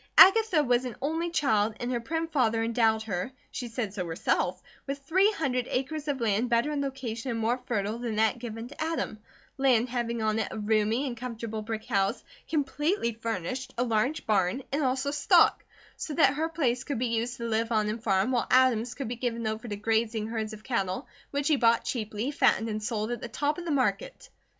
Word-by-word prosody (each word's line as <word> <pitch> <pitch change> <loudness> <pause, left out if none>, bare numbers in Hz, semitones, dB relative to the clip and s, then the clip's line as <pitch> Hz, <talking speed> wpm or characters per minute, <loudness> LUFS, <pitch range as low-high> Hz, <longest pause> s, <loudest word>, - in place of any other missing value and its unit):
Agatha 385 -4 +7
was 245 -2 +2
an 245 -4 -5
only 320 +5 -1
child, 220 -10 +1
and 245 +1 -2
her 240 - 0
prim 325 +7 -2
father 230 -8 +1
endowed 225 -1 +2
her, 200 +2 -3 0.2
she 245 - -4
said 225 -4 -3
so 195 -3 -3
herself, 165 0 0 0.3
with 275 0 -2
three 370 +9 +3
hundred 255 -8 -1
acres 290 +4 -2
of 280 -2 -1
land, 230 +1 +1
better 235 +5 +2
in 290 -1 -1
location 260 -3 -4
and 230 -2 -2
more 235 +3 +1
fertile 215 0 -1
than 235 -3 -3
that 220 +2 +2
given 225 -1 -6
to 290 +4 -5
Adam, 315 -9 -2 0.4
land 255 -3 +3
having 235 -1 -2
on 220 0 +1
it 220 - 0
a - - -6
roomy 215 +4 +1
and 245 -3 -4
comfortable 230 -2 -5
brick 220 0 -5
house, 195 -5 0 0.3
completely 295 - 0
furnished, 230 +3 -4
a 245 - +2
large 250 +6 0
barn 205 +4 +1
and 285 +3 0
also 265 +1 0
stock; 290 0 +4 0.3
so 300 - -4
that 265 - +5
her 315 +3 -1
place 265 -7 0
could 285 - -3
be 250 - 0
used 235 +1 -1
to 235 - -5
live 225 +1 0
on 215 -2 +2
and 215 +2 -3
farm, 195 +1 +2
while 245 -2 +1
Adam's 250 -2 +3
could 275 - -4
be 240 - -3
given 235 -1 -2
over 220 +2 -3
to 205 - -3
grazing 220 +1 0
herds 220 -1 -3
of 215 0 -10
cattle 215 -1 -2 0.2
which 285 0 -1
he 305 - +4
bought 230 -2 +3
cheaply, 220 +2 -2
fattened 230 -5 +2
and 215 0 -3
sold 215 +1 -2
at 240 - -3
the - - -4
top 295 +6 -1
of 345 - -7
the - - -3
market. 310 - -1
235 Hz, 210 wpm, -28 LUFS, 220-275 Hz, 0.4 s, Agatha